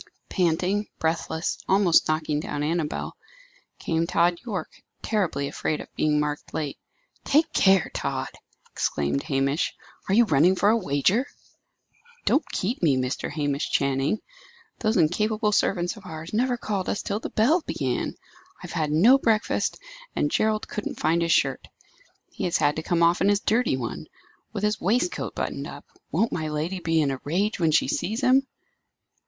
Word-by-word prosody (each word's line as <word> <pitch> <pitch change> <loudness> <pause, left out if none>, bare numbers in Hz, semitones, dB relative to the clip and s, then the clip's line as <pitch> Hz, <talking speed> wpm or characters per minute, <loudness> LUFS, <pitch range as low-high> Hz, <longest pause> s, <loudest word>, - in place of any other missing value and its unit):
Panting, 185 +3 +1
breathless, 160 0 -1
almost 190 -3 +4
knocking 155 -1 0
down 145 -1 -3
Annabel, 155 0 -2 0.6
came 165 0 -1
Tod 175 0 +2
Yorke, 215 -6 -5 0.2
terribly 175 -10 0
afraid 150 +2 -2
of - - -10
being 150 -1 +2
marked 150 0 -3
late. 150 -3 -3 0.4
"Take 305 +3 +2
care, 190 -3 +4
Tod!" 135 -1 -2 0.4
exclaimed 70 -1 -1
Hamish. 140 +3 0 0.3
"Are 195 - +3
you 235 +1 +6
running 170 +1 +4
for 200 +2 +3
a 220 - +5
wager?" 190 - +1 1.0
"Don't 300 - +2
keep 230 +8 -2
me, 145 -6 +3
Mr. 130 0 -2
Hamish 145 -1 -2
Channing! 140 +7 +1 0.6
Those 220 -1 +1
incapable 210 +6 +2
servants 180 -2 +1
of 200 -4 -13
ours 160 +1 -8
never 245 +3 +1
called 200 -5 -3
us - - -2
till 205 +1 -2
the - - -5
bell 290 +11 +3
began. 130 -4 -2 0.4
I - - -23
have - - -8
had 155 -2 0
no 225 - +6
breakfast, 225 -4 +1 0.4
and 145 - 0
Gerald 215 0 +1
couldn't 210 - -5
find 165 +2 +2
his 170 0 +1
shirt. 135 -4 +1 0.6
He - - -4
has 175 - +1
had 145 - +2
to - - -1
come 170 +1 +1
off 170 +1 +3
in 195 - +4
his 205 0 +3
dirty 220 - +1
one, 130 +5 -5 0.4
with 205 -2 -5
his 210 0 0
waistcoat 245 - 0
buttoned - - -3
up. - - -10 0.3
Won't 230 - +1
my 155 -2 -2
lady 160 +5 -2
be 165 -2 +1
in 140 - 0
a 135 - -5
rage 195 +9 0
when 165 -2 +3
she 155 - +3
sees 220 +5 -2
him?" 270 +1 +4
170 Hz, 165 wpm, -25 LUFS, 150-210 Hz, 1.0 s, you